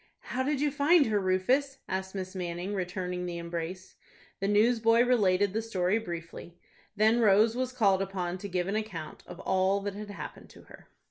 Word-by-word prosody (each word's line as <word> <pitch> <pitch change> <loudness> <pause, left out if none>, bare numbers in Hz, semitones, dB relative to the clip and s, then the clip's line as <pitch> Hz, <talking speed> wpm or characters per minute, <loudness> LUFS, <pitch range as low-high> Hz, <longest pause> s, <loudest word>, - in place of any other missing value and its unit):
"How 255 - 0
did 280 +1 0
you 295 -1 +2
find 290 +3 +4
her, 215 -2 +1
Rufus?" 225 +10 +1
asked 190 +1 -4
Miss 185 -1 -5
Manning, 180 +1 -4
returning 180 -1 -3
the 175 -1 -4
embrace. 170 +2 -6 0.4
The 195 - -1
newsboy 230 +2 +4
related 205 -6 +2
the 220 - 0
story 200 -2 0
briefly. 170 -3 -8 0.4
Then 220 +3 +4
Rose 220 +1 +4
was 255 0 -1
called 200 -6 +2
upon 185 -2 -3
to 200 +1 -6
give 180 -1 -1
an 200 - -1
account 210 -8 -5
of 175 - -10
all 190 +1 +2
that 200 0 -4
had 205 +1 -8
happened 205 - -8
to - - -16
her. - - -16
195 Hz, 185 wpm, -29 LUFS, 185-225 Hz, 0.4 s, find